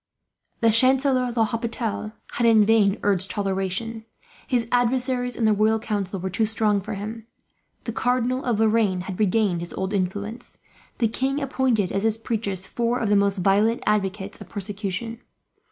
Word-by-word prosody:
The 230 Hz, -1 st, +5 dB
Chancellor 255 Hz, +1 st, +3 dB
L'Hopital 230 Hz, -1 st, -2 dB, 0.2 s
had, 235 Hz, -, +1 dB
in 220 Hz, -2 st, +6 dB
vain, 210 Hz, -2 st, +3 dB
urged 195 Hz, -2 st, +2 dB
toleration. 195 Hz, +3 st, -2 dB, 0.4 s
His 240 Hz, -3 st, 0 dB
adversaries 245 Hz, 0 st, +1 dB
in 230 Hz, -, 0 dB
the 215 Hz, -, +4 dB
royal 215 Hz, +2 st, +3 dB
council 200 Hz, -3 st, -3 dB
were 190 Hz, +1 st, -4 dB
too 220 Hz, +4 st, +1 dB
strong 210 Hz, -2 st, +1 dB
for 215 Hz, +2 st, -5 dB
him. 220 Hz, +3 st, -7 dB, 0.6 s
The 230 Hz, -, -4 dB
Cardinal 250 Hz, +2 st, 0 dB
of 235 Hz, -4 st, 0 dB
Lorraine 215 Hz, -4 st, +2 dB
had 185 Hz, +1 st, -7 dB
regained 205 Hz, -3 st, +2 dB
his 170 Hz, 0 st, -6 dB
old 190 Hz, +2 st, -3 dB
influence. 205 Hz, +5 st, -3 dB, 0.4 s
The 230 Hz, -, +2 dB
king 265 Hz, +5 st, -1 dB
appointed, 260 Hz, -8 st, 0 dB
as 195 Hz, -, -1 dB
his 220 Hz, 0 st, +1 dB
preachers, 205 Hz, -5 st, -3 dB
four 235 Hz, +3 st, -1 dB
of 220 Hz, -, -1 dB
the 205 Hz, -, +4 dB
most 200 Hz, -2 st, +2 dB
violent 210 Hz, +4 st, +2 dB
advocates 200 Hz, -1 st, -1 dB
of -, -, -10 dB
persecution. 205 Hz, +3 st, -5 dB
220 Hz, 160 wpm, -24 LUFS, 200-235 Hz, 0.6 s, in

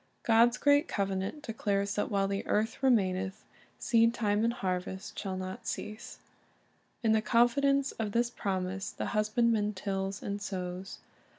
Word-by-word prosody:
"^ -, -, -43 dB
God's 235 Hz, +2 st, +5 dB
great 285 Hz, +3 st, +4 dB
covenant 195 Hz, +8 st, -2 dB
declares 200 Hz, -3 st, -1 dB
that 205 Hz, -, -1 dB
"while 195 Hz, -1 st, +1 dB
the 200 Hz, 0 st, -2 dB
earth 220 Hz, +4 st, 0 dB
remaineth, 190 Hz, -7 st, +1 dB, 0.3 s
seed 230 Hz, 0 st, +3 dB
time 210 Hz, -2 st, +1 dB
and 230 Hz, -, +3 dB
harvest... 190 Hz, -4 st, -4 dB
shall 190 Hz, -2 st, -3 dB
not 185 Hz, 0 st, -6 dB
cease." 215 Hz, +1 st, -5 dB
^ -, -, -36 dB, 0.8 s
In 225 Hz, -, +3 dB
the 220 Hz, 0 st, +4 dB
confidence 270 Hz, +5 st, +3 dB
of 215 Hz, -2 st, -3 dB
this 235 Hz, +2 st, +1 dB
promise 190 Hz, -2 st, -2 dB
the -, -, -5 dB
husbandman 215 Hz, 0 st, +2 dB
tills 195 Hz, 0 st, -3 dB
and 200 Hz, 0 st, -3 dB
sows. 185 Hz, -2 st, -5 dB
205 Hz, 155 wpm, -30 LUFS, 195-235 Hz, 0.8 s, God's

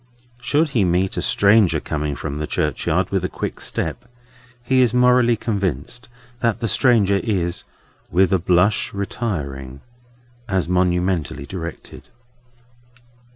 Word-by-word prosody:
Should 150 Hz, +6 st, +1 dB
he 120 Hz, -7 st, +1 dB
meet 90 Hz, +1 st, +1 dB
a -, -, -1 dB
stranger 100 Hz, -2 st, +4 dB
coming 75 Hz, -1 st, -3 dB
from 70 Hz, +3 st, -5 dB
the 75 Hz, -, -3 dB
churchyard 75 Hz, -4 st, -1 dB
with -, -, 0 dB
a -, -, -1 dB
quick -, -, -5 dB
step, -, -, -3 dB, 0.6 s
he 130 Hz, +1 st, +2 dB
is 125 Hz, -2 st, +2 dB
morally 125 Hz, -1 st, +4 dB
convinced 110 Hz, +4 st, -3 dB, 0.3 s
that 115 Hz, -3 st, 0 dB
the 115 Hz, -, -1 dB
stranger 105 Hz, -4 st, +3 dB
is 90 Hz, -6 st, -2 dB, 0.4 s
"with 95 Hz, +2 st, +3 dB
a 95 Hz, -, +3 dB
blush 90 Hz, +5 st, +1 dB
retiring," 70 Hz, -, -4 dB, 0.7 s
as 95 Hz, -3 st, 0 dB
monumentally 90 Hz, -4 st, 0 dB
directed. 85 Hz, 0 st, -8 dB
95 Hz, 125 wpm, -21 LUFS, 85-115 Hz, 0.7 s, stranger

